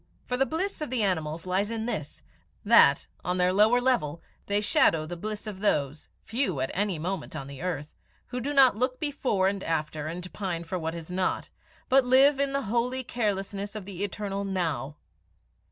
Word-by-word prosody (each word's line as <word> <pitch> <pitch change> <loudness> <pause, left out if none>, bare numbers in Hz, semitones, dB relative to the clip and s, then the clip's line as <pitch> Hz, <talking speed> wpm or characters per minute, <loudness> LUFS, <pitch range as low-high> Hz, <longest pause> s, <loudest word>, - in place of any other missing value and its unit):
For 250 - -1
the 270 +2 +2
bliss 370 +3 -3
of 305 - -3
the 245 -3 0
animals 165 -4 -1
lies 190 +3 0
in 225 -1 -3
this, 180 -12 -4 0.4
that, - - +6 0.2
on 180 +1 -1
their 180 0 +3
lower 215 +5 +5
level, 240 - +1 0.3
they 205 0 +2
shadow 165 -6 +3
the 175 +3 -6
bliss 210 +5 -5
of 205 -3 -6
those 150 -7 0
few 225 - -1
at 130 +1 -1
any 195 -2 0
moment 170 +1 -4
on 140 -3 -5
the 140 +1 -9
earth 160 -5 -3 0.4
who 250 - -3
do 275 +4 -2
not 270 -5 +6
"look 255 +3 -1
before 265 -10 +1
and 195 0 -1
after, 155 -1 -2
and 175 +3 -6
pine 180 -5 -3
for 180 +2 -3
what 160 0 -3
is 170 +1 -8
not," 185 0 -1 0.4
but 265 +1 +5
live 270 +3 +5
in 280 -1 +1
the 275 0 -1
holy 240 +4 0
carelessness 205 -3 -2
of 210 -3 -6
the 195 -1 -5
eternal 200 0 -3
now. 160 -8 -2
195 Hz, 190 wpm, -28 LUFS, 170-245 Hz, 0.4 s, that